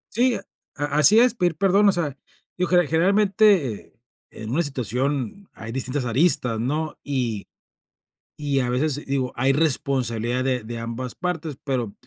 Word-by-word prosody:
Sí, 245 +1 +3 0.4
a 145 -1 -2
así 150 - +5
es, 245 0 +4
pedir 180 -8 0
perdón. 200 +1 +4
O - - +5
sea, 160 -7 -2 0.4
yo, 180 -1 -1
ge 175 -1 +3
generalmente, 190 - +2 0.3
en 110 +1 -6
una 155 +7 +1
situación, 135 - -2
hay 115 0 -7
distintas 130 +1 -2
aristas, 125 -2 +2
¿no? 150 +6 -2
Y 125 -7 -3 0.9
y 145 -2 0
a 125 - -2
veces, 145 +3 0
digo, 135 -2 -2
hay 135 +2 +2
responsabilidad 130 -5 +1
de 125 -3 0
de 115 +2 -6
ambas 115 +2 -5
partes, 165 -5 -4
pero 125 -7 -2
140 Hz, 150 wpm, -23 LUFS, 125-175 Hz, 0.9 s, así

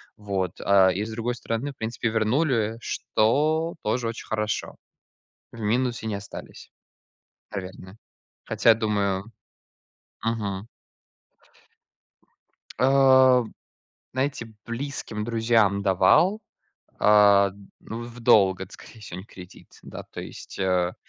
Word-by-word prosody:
Вот. 95 -4 -3
А, 95 -1 +5
и 100 - -2
с 110 - -6
другой 115 +2 -3
стороны, 120 +4 -3
в - - -40
принципе, 115 +1 -3
вернули, 115 0 +1
что 155 +11 0
тоже 115 +2 -1
очень 115 - -6
хорошо. 105 -2 -3 0.8
В 115 - -9
минусе 120 +1 0
не 105 - -2
остались, 100 0 -10 0.8
наверное. 95 0 -8 0.5
Хотя, 115 -1 +4
думаю 105 -1 -1 0.9
Мгм. 105 -2 -3 2.1
А, 130 -1 +6 0.7
знаете, 130 -2 -2 0.2
близким 120 -3 -5
друзьям 110 -3 +2
давал, 100 - +4 0.6
а, 100 -2 +5 0.3
ну, 115 +1 -7
в 120 +1 -10
долг, 95 -4 +4
это 95 - -8
скорее 115 - -14
всего, 90 -4 -8
не - - -9
в - - -35
кредит. 90 -1 -14
Да - - -8
то - - -9
есть, - - -10
э. 90 -2 +1
110 Hz, 115 wpm, -25 LUFS, 100-120 Hz, 2.1 s, А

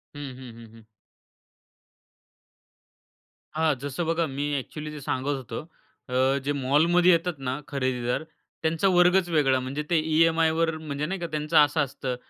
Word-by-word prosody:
हं, 145 - -7 0.2
हं, 130 -3 -10
हं, 115 -1 -14
हं. 110 - -18 2.7
हां, 160 -1 +2
जसं 145 +4 -3
बघा 165 0 +1
मी 135 +1 -4
एक्चुअली 150 +3 -6
जे 150 - -8
सांगत 135 +2 -2
होतो. 120 -3 -6 0.5
अ, 130 +2 +2
जे 145 - 0
मॉलमध्ये 160 +7 +3
येतात 170 +1 +2
ना 135 +1 -3
खरेदीदार, 130 -1 -1 0.4
त्यांचा 160 +4 +1
वर्गच 180 0 +4
वेगळा. 135 -5 +3
म्हणजे 135 +4 -4
ते 170 -2 +3
ईएमआयवर, 160 0 +2
म्हणजे 150 -2 -4
नाही 190 +4 -3
का 170 - -3
त्यांचं 155 +1 0
असं 150 +1 +5
असतं 135 -2 -3
150 Hz, 145 wpm, -26 LUFS, 135-165 Hz, 2.7 s, असं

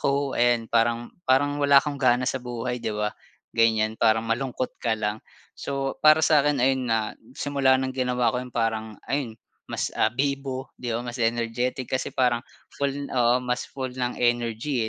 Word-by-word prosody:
ako 140 0 0
and 120 -1 +1
parang 115 +1 +1 0.2
parang 145 +2 +3
wala 140 0 +5
kong 145 -2 -4
gana 125 -1 +3
sa 130 0 -1
buhay, 125 0 -4
di 115 - -3
ba? 105 0 -2 0.4
Ganyan, 110 -1 +2
parang 110 0 +3
malungkot 125 +2 -3
ka 115 -2 0
lang. 105 0 -2 0.3
So, 135 -1 -4
para 155 0 +6
sa 155 -2 +5
akin 145 0 +1
ayun 130 -1 +1
nga 110 -2 0 0.2
simula 140 -2 +2
ng 130 0 -2
ginawa 125 -3 +1
ko 125 - -1
'yon 125 - -7
parang 110 -2 -2
ayun 130 -6 -2 0.3
mas, - - -2
ah, 110 - +2
bibo, 135 +1 -3
di 125 - -4
ba? 115 +1 -2
Mas 120 0 -6
energetic 120 +2 0
kasi 130 - 0
parang 125 -2 +2 0.4
full 140 0 -2
oo 125 0 +3
mas 125 0 -2
full 130 -2 -5
ng 125 -1 -3
energy 120 +1 0
125 Hz, 175 wpm, -25 LUFS, 115-135 Hz, 0.4 s, para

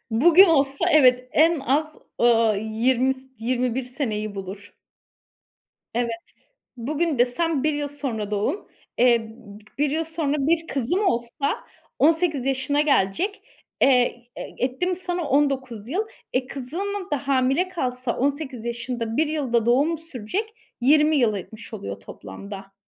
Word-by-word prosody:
Bugün 340 - +7
olsa 275 -5 +2
evet 255 -4 +5
en 320 0 +4
az 290 +4 +1 0.3
,ııı, 230 -3 +4
20 240 +5 +1
s 260 - -13 0.2
21 250 +2 -1
seneyi 225 -5 -3
bulur. 195 +1 -8 1.2
Evet. 240 -1 0 0.7
Bugün 295 +3 -1
desem 275 +4 +1
1 310 0 +2
yıl 290 0 -2
sonra 245 -8 -4
doğum. 215 - -1 0.3
Eee, 240 -1 +5
b 220 -2 -13 0.2
1 290 +1 +2
yıl 320 +2 0
sonra 315 -3 -2
1 330 0 +1
kızım 285 - 0
olsa 240 -1 -1 0.3
18 315 -3 +2
yaşına 270 +2 +1
gelecek. 300 - +1 0.4
Eee, 250 -2 +3
e - - -3
etti 260 +7 -2
mi 365 - 0
sana 355 -1 -3
19 260 -6 0
yıl. 390 +9 -1 0.3
E, 255 0 0
kızım 370 +10 -4
da 285 -1 -2
hamile 270 +6 +2
kalsa 255 -8 -2
18 275 -3 -2
yaşında, 235 -1 -3
1 315 0 +3
yıl 295 -6 -3
da 235 -2 +3
doğumu 280 +8 +3
sürecek. 325 - -5 0.3
20 300 +3 +5
yıl 235 -7 +3
etmiş 215 +3 -9
oluyor 100 0 -6
toplamda. 195 - -10
265 Hz, 140 wpm, -24 LUFS, 235-310 Hz, 1.2 s, Bugün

